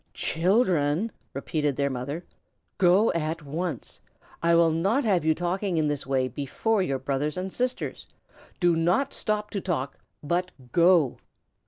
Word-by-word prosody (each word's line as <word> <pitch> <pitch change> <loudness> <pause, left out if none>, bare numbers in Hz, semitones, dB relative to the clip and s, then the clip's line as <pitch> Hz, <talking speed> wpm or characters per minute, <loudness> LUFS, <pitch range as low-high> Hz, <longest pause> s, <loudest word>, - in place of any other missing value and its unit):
"Children!" 180 0 +1 0.2
repeated 145 +1 -1
their 140 0 0
mother. 140 +7 -5 0.5
"Go 190 +4 +5
at 160 0 -2
once. 155 0 -4 0.4
I 170 0 +4
will 165 -1 +5
not 195 - +1
have 190 -7 +2
you 160 0 +3
talking 180 +1 -1
in 155 -2 +2
this 145 -2 -3
way 130 -1 +1
before 145 - -1
your 140 -7 0
brothers 140 +3 -2
and 185 +1 -4
sisters. 250 +1 -3 0.5
Do 175 -2 +3
not 175 +12 +1
stop 210 -1 -2
to 200 - -3
talk, 150 -8 -3 0.2
but 175 +5 0 0.2
go!" 170 -4 +4
170 Hz, 145 wpm, -26 LUFS, 145-185 Hz, 0.5 s, Go